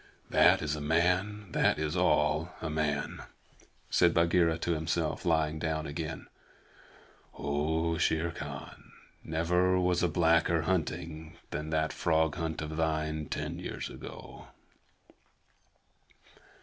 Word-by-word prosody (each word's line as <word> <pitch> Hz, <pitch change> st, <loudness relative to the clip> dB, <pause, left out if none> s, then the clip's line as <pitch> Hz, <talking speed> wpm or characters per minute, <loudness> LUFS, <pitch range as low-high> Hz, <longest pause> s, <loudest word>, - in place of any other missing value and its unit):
"That -, -, +5 dB
is 75 Hz, 0 st, -1 dB
a 75 Hz, -, -5 dB
man. 90 Hz, +6 st, +1 dB
That -, -, +2 dB
is 75 Hz, +2 st, -2 dB
all 80 Hz, -2 st, +2 dB
a 80 Hz, -, -4 dB
man," 75 Hz, -2 st, -1 dB, 0.7 s
said 85 Hz, -1 st, +4 dB
Bagheera 85 Hz, -1 st, +3 dB
to 85 Hz, -, -2 dB
himself, 80 Hz, +1 st, -2 dB
lying 80 Hz, -2 st, +1 dB
down 80 Hz, -1 st, -2 dB
again. 80 Hz, +2 st, -5 dB, 1.1 s
"Oh, 80 Hz, +3 st, 0 dB
Shere 80 Hz, +1 st, +1 dB
Khan, 75 Hz, -4 st, -9 dB, 0.3 s
never 90 Hz, +3 st, +2 dB
was 90 Hz, -1 st, +2 dB
a 90 Hz, -, +3 dB
blacker 85 Hz, 0 st, +3 dB
hunting 80 Hz, -2 st, -3 dB
than 75 Hz, +1 st, -4 dB
that 80 Hz, 0 st, 0 dB
frog 80 Hz, -2 st, +2 dB
hunt 80 Hz, -1 st, -3 dB
of 80 Hz, 0 st, -5 dB
thine 80 Hz, -1 st, -1 dB
ten -, -, -4 dB
years -, -, -5 dB
ago!" -, -, -10 dB
80 Hz, 120 wpm, -30 LUFS, 75-85 Hz, 1.1 s, That